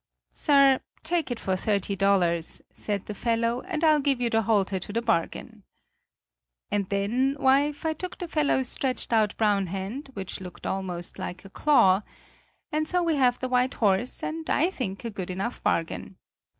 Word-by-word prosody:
"'Sir, 275 Hz, -3 st, +4 dB, 0.2 s
take 335 Hz, -2 st, 0 dB
it 240 Hz, -2 st, -3 dB
for 190 Hz, -, -1 dB
thirty 200 Hz, 0 st, 0 dB
dollars,' 180 Hz, -4 st, +1 dB
said 205 Hz, -2 st, -3 dB
the 210 Hz, -, -5 dB
fellow, 230 Hz, +3 st, 0 dB
'and 335 Hz, -4 st, -2 dB
I'll 310 Hz, -2 st, +5 dB
give 275 Hz, -3 st, +1 dB
you 240 Hz, -1 st, 0 dB
the 225 Hz, -, +3 dB
halter 200 Hz, -3 st, +1 dB
to 185 Hz, -, -7 dB
the 230 Hz, -, 0 dB
bargain.' 225 Hz, -8 st, -2 dB, 1.1 s
"And 200 Hz, -2 st, 0 dB
then, 240 Hz, +8 st, +1 dB
wife, 285 Hz, +3 st, +2 dB
I 320 Hz, -, +1 dB
took 365 Hz, +4 st, -7 dB
the 355 Hz, -, -5 dB
fellow's 290 Hz, -5 st, +1 dB
stretched 255 Hz, -2 st, -2 dB
out 215 Hz, -2 st, +2 dB
brown 205 Hz, -3 st, +2 dB
hand, 195 Hz, -, -5 dB
which 190 Hz, -1 st, -6 dB
looked 180 Hz, -1 st, -10 dB
almost 180 Hz, -3 st, -3 dB
like 180 Hz, +2 st, -6 dB
a 195 Hz, -, -12 dB
claw. 195 Hz, -11 st, +4 dB, 0.7 s
And 310 Hz, 0 st, 0 dB
so 360 Hz, +1 st, +1 dB
we 330 Hz, -3 st, +1 dB
have 250 Hz, -2 st, +3 dB
the 255 Hz, -, -3 dB
white 250 Hz, +1 st, +1 dB
horse, 210 Hz, +3 st, +1 dB
and 320 Hz, 0 st, -4 dB
I 335 Hz, +6 st, +2 dB
think 205 Hz, -, -5 dB
a 230 Hz, -, -3 dB
good 190 Hz, -3 st, -5 dB
enough 195 Hz, +7 st, -3 dB
bargain. 165 Hz, +3 st, -1 dB
230 Hz, 175 wpm, -26 LUFS, 195-280 Hz, 1.1 s, I'll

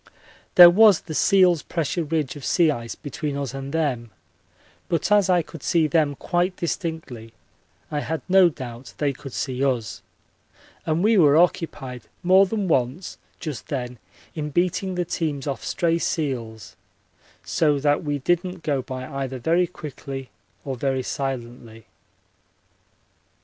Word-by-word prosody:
There 175 Hz, -1 st, +11 dB
was 205 Hz, -1 st, +6 dB
the 160 Hz, -, -8 dB
seals' 180 Hz, -2 st, +4 dB
pressure 165 Hz, +1 st, -2 dB
ridge 155 Hz, -3 st, -2 dB
of 145 Hz, -, -10 dB
sea 165 Hz, +1 st, +3 dB
ice 115 Hz, -4 st, -5 dB
between 145 Hz, -1 st, -5 dB
us 140 Hz, -3 st, -4 dB
and 135 Hz, 0 st, -6 dB
them, 140 Hz, -7 st, -1 dB, 0.8 s
but 170 Hz, +4 st, -1 dB
as 205 Hz, -2 st, +4 dB
I 175 Hz, -2 st, +3 dB
could 160 Hz, -1 st, -11 dB
see 165 Hz, +2 st, +2 dB
them 155 Hz, -2 st, +1 dB
quite 175 Hz, +5 st, -1 dB
distinctly 160 Hz, -, -5 dB, 0.6 s
I 150 Hz, -, -1 dB
had 160 Hz, -1 st, -4 dB
no 185 Hz, -1 st, +6 dB
doubt 130 Hz, -4 st, -9 dB
they 145 Hz, -2 st, 0 dB
could 135 Hz, +1 st, -10 dB
see 130 Hz, +1 st, -3 dB
us, 125 Hz, -6 st, -1 dB, 0.9 s
and 160 Hz, +3 st, +1 dB
we 220 Hz, +1 st, +4 dB
were 150 Hz, -3 st, +6 dB
occupied 145 Hz, -7 st, 0 dB, 0.2 s
more 190 Hz, +2 st, +5 dB
than 205 Hz, -1 st, -2 dB
once 135 Hz, +3 st, -1 dB, 0.2 s
just 150 Hz, -9 st, -6 dB
then 125 Hz, -3 st, -4 dB, 0.3 s
in 150 Hz, -2 st, -4 dB
beating 180 Hz, +4 st, 0 dB
the 175 Hz, 0 st, -1 dB
teams 150 Hz, -5 st, -3 dB
off 140 Hz, -2 st, -4 dB
stray 170 Hz, -1 st, 0 dB
seals, 120 Hz, -10 st, -3 dB, 0.7 s
so 150 Hz, -3 st, +1 dB
that 145 Hz, +1 st, +1 dB
we 145 Hz, -1 st, -1 dB
didn't 175 Hz, +4 st, -1 dB
go 140 Hz, -3 st, 0 dB
by 130 Hz, -1 st, -6 dB
either 135 Hz, -1 st, -4 dB
vary 170 Hz, +8 st, +2 dB
quickly 135 Hz, -5 st, -8 dB, 0.3 s
or 135 Hz, -2 st, -3 dB
very 135 Hz, 0 st, -1 dB
silently. 120 Hz, -4 st, -5 dB
150 Hz, 145 wpm, -23 LUFS, 130-175 Hz, 0.9 s, There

